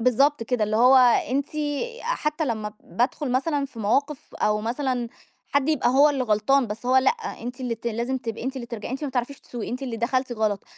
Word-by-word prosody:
بالضبط 255 Hz, +3 st, +3 dB
كده 230 Hz, -1 st, 0 dB
اللي 215 Hz, +1 st, -1 dB
هو 250 Hz, +3 st, +7 dB, 0.3 s
أنتِ 280 Hz, +3 st, -1 dB
أ 305 Hz, -, -3 dB
حتّى 315 Hz, -10 st, -1 dB
لمّا 215 Hz, -5 st, -3 dB
بادخل 255 Hz, +3 st, -1 dB
مثلًا 285 Hz, +2 st, +1 dB
في 260 Hz, -4 st, -14 dB
مواقِف 275 Hz, +8 st, -1 dB
أو 210 Hz, 0 st, +1 dB
مثلًا 245 Hz, +1 st, -2 dB, 0.4 s
حد 285 Hz, 0 st, +2 dB
يبقى 305 Hz, -6 st, +2 dB
هو 275 Hz, +4 st, +6 dB
اللي 270 Hz, -3 st, -1 dB
غلطان 240 Hz, +5 st, +2 dB
بس 215 Hz, +3 st, -6 dB
هو 255 Hz, +1 st, +4 dB
لأ، 260 Hz, 0 st, +5 dB, 0.3 s
أنتِ 245 Hz, +3 st, -6 dB
اللي 245 Hz, -2 st, -2 dB
ت 230 Hz, +1 st, -10 dB
لازم 235 Hz, +3 st, -1 dB
تبقي 225 Hz, -3 st, -5 dB
أنتِ 265 Hz, +1 st, -3 dB
اللي 245 Hz, -2 st, -5 dB
ترجَ 230 Hz, -3 st, -6 dB
أنتِ 265 Hz, +4 st, -5 dB
ما -, -, -2 dB
بتعرفيش 255 Hz, +2 st, -3 dB
تسوقي 235 Hz, -3 st, -6 dB
أنتِ 250 Hz, +3 st, -4 dB
اللي 245 Hz, -4 st, -3 dB
دَخَلتِ 255 Hz, +2 st, 0 dB
غلط، 215 Hz, -3 st, -1 dB
255 Hz, 210 wpm, -24 LUFS, 230-280 Hz, 0.4 s, هو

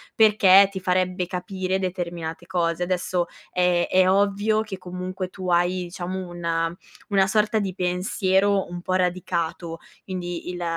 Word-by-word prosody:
perché 200 Hz, -3 st, +7 dB
ti 190 Hz, -, -5 dB
farebbe 185 Hz, 0 st, 0 dB
capire 185 Hz, +1 st, -2 dB
determinate 175 Hz, -3 st, -4 dB
cose. 170 Hz, -2 st, 0 dB
Adesso 180 Hz, -1 st, -1 dB, 0.2 s
è 180 Hz, -1 st, +2 dB
è 185 Hz, 0 st, +4 dB
ovvio 205 Hz, +2 st, +2 dB
che 215 Hz, -3 st, -6 dB
comunque 185 Hz, +1 st, -5 dB
tu 185 Hz, -1 st, -6 dB
hai, 175 Hz, +1 st, +2 dB
diciamo, 180 Hz, +1 st, -5 dB
una 170 Hz, -1 st, -2 dB, 0.3 s
una 195 Hz, -2 st, +3 dB
sorta 215 Hz, +2 st, +2 dB
di 195 Hz, -3 st, -3 dB
pensiero 190 Hz, +2 st, +1 dB
un 175 Hz, 0 st, -6 dB
po' 185 Hz, +1 st, -2 dB
radicato, 175 Hz, -2 st, -1 dB, 0.3 s
quindi 175 Hz, -2 st, -5 dB
il 175 Hz, -1 st, -4 dB
185 Hz, 140 wpm, -24 LUFS, 175-190 Hz, 0.3 s, perché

